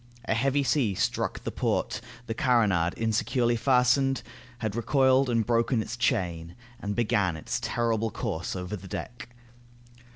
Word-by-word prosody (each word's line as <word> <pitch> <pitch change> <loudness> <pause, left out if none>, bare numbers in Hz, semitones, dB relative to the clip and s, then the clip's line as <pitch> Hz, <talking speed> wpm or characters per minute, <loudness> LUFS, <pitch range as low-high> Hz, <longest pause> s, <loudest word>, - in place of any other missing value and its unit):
A - - +1
heavy 135 +5 +1
sea 120 -5 +1
struck - - -1
the - - -3
port, - - -1 0.2
the 115 - -3
carronade, 110 - +2
insecurely 120 +2 +1
fastened, 130 +2 +3 0.3
had 110 -3 -3
recoiled 130 +2 +3
and 115 -2 +1
broken 115 +1 +2
its 110 +1 -3
chain, 85 -7 -1 0.2
and 105 -3 -3
began 100 -7 +1
its 75 - -3
terrible 115 -1 0
course 95 -7 -4
over 90 +2 -4
the 95 -1 -10
deck. 120 +4 -7
115 Hz, 140 wpm, -27 LUFS, 100-125 Hz, 0.3 s, fastened